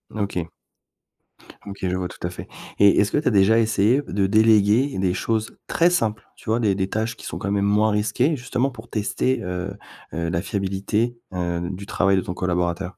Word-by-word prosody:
OK. 100 Hz, -5 st, -2 dB, 1.2 s
OK, 100 Hz, -1 st, -8 dB
je 90 Hz, -, -1 dB
vois 90 Hz, -1 st, -2 dB
tout 90 Hz, -, -8 dB
à -, -, -1 dB
fait 90 Hz, -, -9 dB, 0.3 s
et 100 Hz, -1 st, +6 dB
est-ce 100 Hz, -, +2 dB
que -, -, +1 dB
tu 150 Hz, -, -1 dB
as -, -, +4 dB
déjà 105 Hz, +2 st, +4 dB
essayé 110 Hz, +4 st, +3 dB
p 140 Hz, -, -10 dB
de 100 Hz, -1 st, +2 dB
déléguer 110 Hz, +4 st, +4 dB
des 95 Hz, -1 st, +1 dB
choses 110 Hz, +4 st, -2 dB
très 170 Hz, +1 st, +3 dB
simples, 115 Hz, -11 st, -1 dB
tu -, -, -10 dB
vois 115 Hz, +2 st, +2 dB
des 105 Hz, -3 st, +2 dB
des 95 Hz, 0 st, -1 dB
tâches 110 Hz, +3 st, -2 dB
qui -, -, -11 dB
sont -, -, -5 dB
quand 100 Hz, -, -3 dB
même 100 Hz, -1 st, +1 dB
moins 105 Hz, +2 st, +3 dB
risquées 110 Hz, +9 st, +1 dB
justement 125 Hz, +1 st, -1 dB
pour 115 Hz, -2 st, -12 dB
tester, 115 Hz, +4 st, -1 dB
heu 90 Hz, +2 st, -4 dB, 0.4 s
heu, 85 Hz, 0 st, -2 dB
la 85 Hz, 0 st, -1 dB
fiabilité, 100 Hz, +4 st, -1 dB, 0.2 s
heu, 85 Hz, -1 st, -2 dB
du 95 Hz, +1 st, -6 dB
travail 100 Hz, -1 st, +2 dB
de 95 Hz, -, +2 dB
ton 90 Hz, -, -5 dB
collaborateur? 90 Hz, +1 st, -2 dB
100 Hz, 210 wpm, -23 LUFS, 95-110 Hz, 1.2 s, et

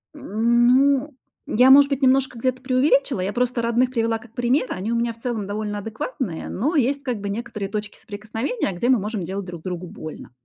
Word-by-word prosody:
М, 235 Hz, +3 st, +2 dB
ну, 275 Hz, +2 st, +3 dB, 0.3 s
я, 250 Hz, +4 st, +5 dB
может 280 Hz, +1 st, +8 dB
быть, 275 Hz, 0 st, -1 dB
немножко 265 Hz, -1 st, +3 dB
где-то 255 Hz, +1 st, -1 dB
преувеличила. 260 Hz, -3 st, +2 dB
Я 195 Hz, +2 st, -2 dB
просто 245 Hz, 0 st, 0 dB
родных 235 Hz, +2 st, +2 dB
привела 230 Hz, -2 st, 0 dB
как 225 Hz, -1 st, -17 dB
пример. 245 Hz, +3 st, +1 dB
Они 195 Hz, +5 st, -3 dB
у 235 Hz, -, +1 dB
меня 235 Hz, 0 st, 0 dB
в -, -, -21 dB
целом 230 Hz, -4 st, -3 dB
довольно 205 Hz, 0 st, -3 dB
адекватные, 220 Hz, -, -5 dB
но 290 Hz, -, -1 dB
есть, 275 Hz, +1 st, +2 dB
как 250 Hz, -5 st, -2 dB
бы, 200 Hz, 0 st, -4 dB
некоторые 210 Hz, -2 st, -4 dB
точки 210 Hz, 0 st, -5 dB
соприкосновения, 220 Hz, -, -4 dB
где 195 Hz, +8 st, -1 dB
мы 255 Hz, -, +5 dB
можем 210 Hz, -1 st, -3 dB
делать 190 Hz, +3 st, -4 dB
друг 175 Hz, -3 st, -9 dB
другу 180 Hz, -1 st, -5 dB
больно. 155 Hz, -4 st, -9 dB
235 Hz, 200 wpm, -22 LUFS, 205-255 Hz, 0.3 s, может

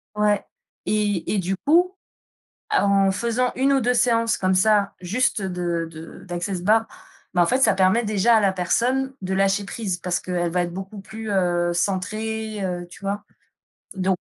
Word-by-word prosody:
Ouais. 210 Hz, -1 st, +1 dB, 0.4 s
Et 205 Hz, -4 st, 0 dB
et -, -, +1 dB
du 190 Hz, +1 st, -2 dB
coup, 350 Hz, -, +3 dB, 0.7 s
à 420 Hz, -, +2 dB
en 195 Hz, -1 st, +4 dB
faisant 235 Hz, +5 st, 0 dB
1 270 Hz, +2 st, +2 dB
ou 270 Hz, -, +3 dB
2 245 Hz, +1 st, +2 dB
séances 230 Hz, -1 st, +2 dB
comme 185 Hz, 0 st, +1 dB
ça, 205 Hz, +1 st, +3 dB
juste 215 Hz, +5 st, 0 dB
de 175 Hz, -3 st, -2 dB
de 160 Hz, 0 st, -11 dB
d'Access 175 Hz, +1 st, -3 dB
Bars, 220 Hz, +3 st, +3 dB, 0.5 s
mais 175 Hz, -, +4 dB
en -, -, +5 dB
fait 255 Hz, +8 st, +1 dB
ça 220 Hz, -6 st, +4 dB
permet 190 Hz, +5 st, +3 dB
déjà 215 Hz, +2 st, +3 dB
à -, -, +5 dB
la 200 Hz, -2 st, +3 dB
personne 245 Hz, +9 st, 0 dB
de 190 Hz, 0 st, -3 dB
lâcher 195 Hz, +1 st, +2 dB
prise, 200 Hz, -3 st, -3 dB
parce 175 Hz, 0 st, -2 dB
qu'elle 175 Hz, -1 st, -2 dB
va 180 Hz, +1 st, +1 dB
être 175 Hz, -1 st, -5 dB
beaucoup, 195 Hz, +3 st, -7 dB
heu, -, -, -7 dB
plus 220 Hz, +2 st, -8 dB, 0.4 s
centrée, 215 Hz, +4 st, -2 dB
heu, 175 Hz, -1 st, -4 dB
tu 180 Hz, -, -14 dB
vois? 200 Hz, +1 st, -3 dB, 0.7 s
Donc, 190 Hz, -1 st, 0 dB
200 Hz, 180 wpm, -23 LUFS, 185-225 Hz, 0.7 s, en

